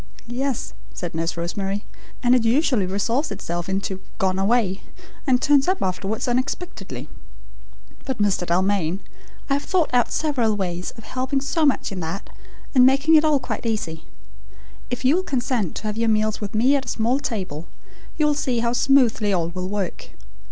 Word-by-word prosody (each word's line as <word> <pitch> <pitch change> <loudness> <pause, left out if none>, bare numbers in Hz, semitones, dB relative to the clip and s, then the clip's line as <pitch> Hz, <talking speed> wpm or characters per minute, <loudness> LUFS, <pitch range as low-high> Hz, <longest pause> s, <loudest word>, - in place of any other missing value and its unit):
"Yes," 250 +2 -2 0.2
said 175 -2 -4
Nurse 165 +1 -2
Rosemary, 195 +4 -3 0.4
"and 245 0 +5
it 250 -2 +4
usually 240 - +2
resolves 230 +10 0
itself 175 +1 -4
into 190 0 -2 0.2
'gone 190 0 +1
away,' 195 -2 +2 0.5
and 255 -2 +4
turns 280 0 +4
up 375 +1 +1
afterwards 195 +5 -2
unexpectedly! 255 +8 -3 1.0
But, 265 -3 -2
Mr. 200 -4 +1
Dalmain, 185 0 +1 0.5
I 275 - +1
have 285 - 0
thought 365 -5 +1
out 245 -1 +3
several 250 -9 +1
ways 180 -3 -2
of 225 - -10
helping 260 +3 -1
so 300 +3 +1
much 275 - +1
in 195 - -4
that 170 +4 -5 0.4
and 255 -2 +7
making 275 +5 +5
it 310 -1 +7
all 305 -2 +4
quite 245 -1 -4
easy. 165 -8 -2 0.9
If - - -4
you 285 +7 +5
will - - +1
consent 250 - -1
to - - -5
have 215 0 -2
your 230 0 +2
meals 215 0 +1
with 205 0 -4
me 255 +6 +4
at 270 -1 -1
a - - -5
small 235 +4 +1
table, 185 - -4 0.5
you 305 - +3
will 300 - +4
see 270 -4 -1
how 235 0 +1
smoothly 245 -5 +3
all 170 -3 +1
will 180 +1 -4
work. 200 -3 -3
225 Hz, 175 wpm, -23 LUFS, 190-270 Hz, 1.0 s, and